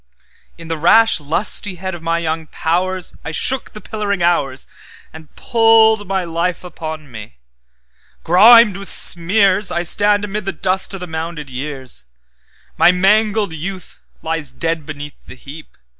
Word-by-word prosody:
In 165 -1 -12
the 165 -1 -4
rash 225 +5 +4
lustihead 185 +4 -1
of 175 - -8
my 165 0 -1
young 160 -1 -3
powers,I 180 +3 -3
shook 260 - -1
the 215 - -10
pillaring 200 -2 -4
hoursAnd 160 0 -4
pulled 225 -3 +3
my 190 -1 -1
life 170 +1 -3
upon 155 -4 -8
me; 105 - -11 0.9
grimed 210 +3 +6
with 200 0 -9
smears,I 185 +1 +2
stand 205 +3 +2
amid 205 0 -5
the 195 - -3
dust 190 +1 0
o' - - -5
the 180 - -7
mounded 160 -3 -6
years—My 70 - -3
mangled 205 +1 +1
youth 185 +4 -7 0.2
lies 160 -4 -4
dead 165 +2 -3
beneath 145 -2 -10
the - - -11
heap. 145 +4 -13
175 Hz, 130 wpm, -17 LUFS, 155-200 Hz, 0.9 s, grimed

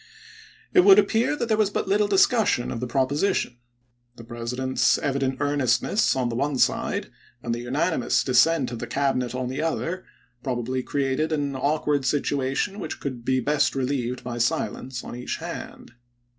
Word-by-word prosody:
It 380 - +6
would 385 +2 +8
appear 245 - +3
that 235 - -2
there 220 -1 +1
was 210 -2 +3
but 205 - -2
little 205 +2 +2
discus 210 +3 +4
sion 120 - 0
of 120 - -4
the 125 - -3
proposition. 135 +1 0 0.6
The 115 - -11
President's 120 +3 0
evident 135 -1 -1
earnestness 145 - +1
on 130 -2 0
the 115 - -4
one 140 +2 -1
side, - - 0 0.3
and 120 - -1
the 120 - -3
unanimous 140 +4 0
dis 125 -3 +3
sent 160 -6 +3
of 120 - -5
the 120 - -5
Cabinet 130 -2 -1
on 130 0 -2
the 130 +4 -3
other, 165 +3 -2 0.4
probably 130 0 -2
created 140 +4 -1
an 145 -3 -1
awkward 145 +1 0
situation 145 +7 -1
which - - -5
could 130 -4 -5
be 130 +1 +1
best 145 +3 +1
relieved 130 -2 -2
by 120 -1 -5
silence 125 +1 -2
on - - -7
each 125 - -4
hand. - - -8
135 Hz, 170 wpm, -24 LUFS, 125-155 Hz, 0.6 s, would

